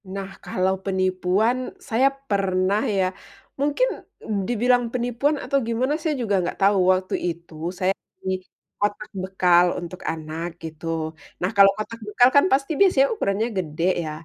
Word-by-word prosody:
Nah, 195 0 -5 0.2
kalau 185 0 +1
penipuan, 185 +4 +1 0.3
saya 245 +4 +4 0.2
pernah 195 0 +1 0.2
ya 190 - +3 0.5
mungkin 290 - +2 0.6
dibilang 245 +1 +3
penipuan 250 +4 0
atau 275 - +1
gimana 245 +5 0
saya 310 -1 0
juga 205 -4 +1
gak - - -4
tau, 200 +1 +4 0.2
waktu 185 0 -3
itu 170 -1 -6 0.3
saya 185 +1 +2 0.2
beli 190 - -3 0.5
kotak 205 +1 -1
bekal 180 -2 +4
untuk 175 +1 -8
anak 160 +1 -5 0.2
gitu. 160 0 -8 0.6
Nah, 180 - +1
kalau 200 -1 +8
kotak 230 +2 -5
bekal 245 +4 +5
kan 285 - +7
pasti 275 +3 +1
biasanya 295 -9 +5
ukurannya 220 - 0
gede 165 -3 -3 0.2
ya. 155 - -4
200 Hz, 145 wpm, -23 LUFS, 185-245 Hz, 0.6 s, kalau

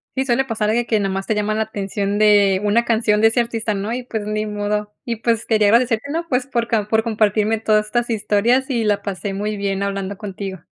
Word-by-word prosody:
Sí, 265 0 0
suele 265 +1 +1
pasar 220 -4 -1
algo 220 - +2
de 240 - 0
que 220 -2 +1
nomás 195 -1 -2
te - - 0
llama 210 0 -1
la 220 - +1
atención 200 -1 -3
de 205 -2 +4
una 220 +3 +2
canción 220 -2 +2
de 220 - +6
ese 225 - 0
artista, 230 -2 -1
¿no? 200 +2 -3
Y, 250 +1 -3
pues, 220 -4 -5
ni 215 0 -1
modo. 210 0 -3
Y, 235 - -2
pues, 230 0 0
quería 215 -2 +3
agradecerte, 230 0 +2
¿no? 335 +1 -3
Pues, 250 -1 0
por 235 -4 -2
ca 215 -3 0
por 220 0 +2
compartirme 215 -1 +1
todas 215 -1 +2
estas 240 +2 -1
historias, 225 +5 +1
y 240 -4 0
la 205 -2 +1
pasé 200 0 -4
muy 210 +2 -3
bien 200 -1 -2
hablando 200 0 -3
contigo. 195 -3 -6
215 Hz, 235 wpm, -20 LUFS, 205-230 Hz, -, de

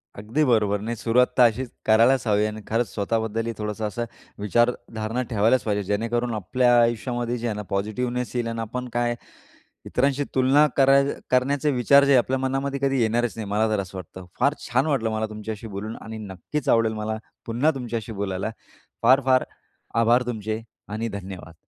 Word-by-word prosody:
अगदी 110 +9 -1
बरोबर. 105 -4 +2
नाही, 115 +2 -3
सुरुवात 120 +2 +3
तर 125 - +7
अशीच 125 +3 -5 0.2
करायलाच 115 +4 +4
हवी 105 -1 +3
आहे 110 - +2
आणि 110 0 -8
खरंच 115 +1 0
स्वतःबद्दलही 110 +2 -1
थोडंसं 105 0 -3
असं 120 +3 -3 0.3
विचारधारणा 115 +2 0
ठेवायलाच 110 +2 +3
पाहिजे, 105 -2 -1
जेणेकरून 115 +4 -1
आपल्या 120 +4 +2
आयुष्यामध्ये 120 +1 0
जे 120 +1 -3
आहे 110 - -2
ना, 105 - -4
पॉझिटिव्हनेस 120 +5 -2
येईल 120 -1 0
आणि 115 0 -4
आपण 125 +3 -4
काय 120 0 0 0.7
इतरांशी 140 +2 +1
तुलना 135 +3 +5
कराय 140 +1 +5 0.2
करण्याचे 140 +3 +2
विचार 140 +2 +5
जे 140 -1 +5
आपल्या 130 +2 +2
मनामध्ये 135 +1 -2
कधी 135 -1 +2
येणारच 115 +1 +1
नाही. 110 -2 -5
मला 110 +2 +2
तर 105 - +1
असं 95 0 -7
वाटतं, 90 +1 -10
फार 140 +3 +3
छान 130 +5 +2
वाटलं 115 -7 0
मला 110 0 -1
तुमच्याशी 110 +1 -6
बोलून. 105 +2 -6
आणि 110 0 -7
नक्कीच 105 - -5
आवडेल 115 -1 +3
मला 110 0 -3 0.3
पुन्हा 120 +7 +2
तुमच्याशी 115 -3 -4
बोलायला, 100 0 -3 0.5
फार 130 +4 +6
फार 130 -1 +4 0.6
आभार 120 +2 +4
तुमचे 110 -1 -3 0.3
आणि 110 +2 -3
धन्यवाद. 95 -5 -8
115 Hz, 170 wpm, -24 LUFS, 110-125 Hz, 0.7 s, तर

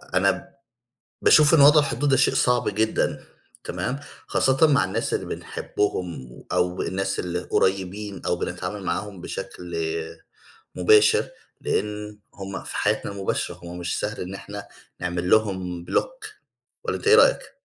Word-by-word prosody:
أنا - - +1 0.7
باشوف 150 +1 +6
إن 160 - +7
وضع 150 +2 +8
الحدود 145 0 0
ده 135 - +4
شيء - - +3
صعب 125 -1 +2
جدًا 110 +2 0 0.4
تمام؟ 135 - -3 0.3
خاصةً 135 +4 +3
مع 140 -9 +4
الناس 95 - -2
اللي - - -1
بنحبهم 90 -10 -3 0.2
أو 90 0 0
الناس 95 +1 -2
اللي 90 0 -2
قريبين 95 +2 -1
أو - - +1
بنتعامل 90 +3 -4
معاهم 90 +2 -3
بشكل 85 0 -7 1.0
مباشر، 105 +4 +5 0.3
لأن 105 +1 -3 0.2
هُم 95 -1 -6
في - - -6
حياتنا - - 0
المباشرة 100 -1 -2
هُم 85 +1 -7
مش 90 0 -2
سهل 105 +1 -3
إن 90 +2 -6
إحنا 100 +1 -8 0.3
نعمل 90 0 -2
لهم 95 -5 +1
بلوك - - -2 0.6
والّا - - -1
أنت - - -2
إيه 440 - +8
رأيك؟ - - +3
100 Hz, 140 wpm, -24 LUFS, 90-110 Hz, 1.0 s, وضع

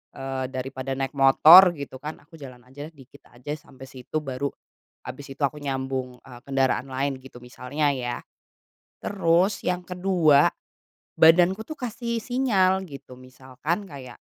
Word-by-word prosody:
eee, 135 0 -4
daripada 130 0 -5
naik 135 0 -3
motor, 160 +6 +7
gitu 140 -3 -8
kan, 155 +2 -6
aku 160 +1 -17
jalan 125 -3 -12
aja, 145 +4 -10
dikit 135 +1 -18
aja 125 +4 -9
sampai 135 -2 -16
situ, 135 +3 -6
baru 135 0 -3 0.6
habis 140 -1 -9
itu 140 - -18
aku 145 +2 -1
nyambung, 130 -2 -4
eee, 125 -2 -13
kendaraan 135 -2 0
lain, 135 0 -3
gitu, 130 -2 -14
misalnya, 140 +4 -2
ya. 125 -3 -4 0.7
Terus 190 0 +1
yang 180 0 -2
ke-2, 180 -6 +3 0.7
badanku 175 +5 +5
tuh 310 +6 -9
kasih 235 -1 -4
sinyal, 200 -7 +1
gitu, 140 -6 -11
misalkan 130 +8 -6
kayak 130 -6 -11
140 Hz, 145 wpm, -24 LUFS, 130-175 Hz, 0.7 s, motor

